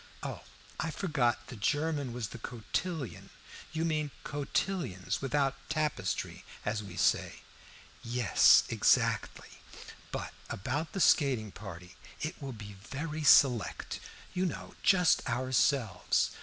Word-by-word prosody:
Oh, - - -5 0.4
I 165 - -1
forgot 130 -9 0
the 125 - -9
German 145 +4 0
was 115 -3 -4
the 115 - -9
cotillon. 130 - -4 0.4
You 160 +1 -1
mean 155 -2 0
cotillons, 145 - -2
without 135 0 +1 0.2
tapestry, 150 -11 -1 0.2
as 110 +1 -1
we 100 -4 -9
say." - - +1 0.6
"Yes, 120 -2 +5
exactly. - - +1 0.5
But - - -4 0.2
about 145 - -3
the 195 - -1
skating 130 - +3
party. 90 -3 -10 0.2
It 155 +1 -4
will 135 -1 -4
be 105 -3 -9
very 150 +7 -4
select, 125 -8 +4 0.3
you 185 +1 +1
know; - - -6
just 180 -5 +5
ourselves. 130 -1 +2
135 Hz, 115 wpm, -31 LUFS, 110-155 Hz, 0.6 s, Yes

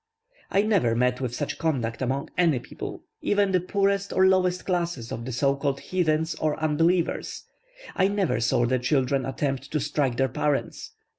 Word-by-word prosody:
I 200 - +3
never 190 - +2
met 125 +2 +1
with 125 -2 -2
such 145 - -3
conduct 130 -9 -1
among 130 +2 -2
any 170 -6 +3
people 120 - -7 0.2
even 205 -1 +2
the 185 - +3
poorest 200 +1 0
or 190 - +4
lowest 185 -1 +2
classes 170 -10 -2
of 115 - -5
the 130 - -4
so 135 +3 +1
called 140 -1 -1
heathens 160 -3 0
or 155 -1 -1
unbelievers; 165 +3 0 0.5
I 190 - +3
never 195 - 0
saw 120 +1 +2
their 130 +1 +1
children 130 +1 +1
attempt 135 0 -2
to 155 - -1
strike 140 -3 -1
their 135 - +3
parents. 140 +3 -2
150 Hz, 170 wpm, -26 LUFS, 130-180 Hz, 0.5 s, or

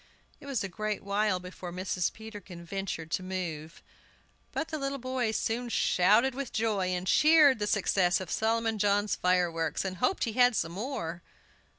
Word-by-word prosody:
It 280 - -13
was 270 -6 -1
a - - -2
great 215 +3 -4
while 200 -1 +1
before 180 0 -8
Mrs. 180 0 -1
Peterkin 205 -6 -10
ventured 175 -3 -5
to - - 0
move. 170 -4 -5 0.7
But 320 - -3
the 310 - -3
little 275 0 -2
boys 255 -3 -1
soon 240 +2 -2
shouted 215 +5 +3
with 270 -1 -5
joy, 215 -4 0
and 180 0 -2
cheered 300 +1 +5
the 210 - -1
success 185 -3 +2
of 185 -3 -7
Solomon 225 0 0
John's 205 -2 +2
fireworks, 175 -2 0
and 185 -1 -4
hoped 380 - +1
he 230 - -2
had 245 0 +4
some 165 -3 -1
more. 175 -5 -4
205 Hz, 170 wpm, -29 LUFS, 180-230 Hz, 0.7 s, cheered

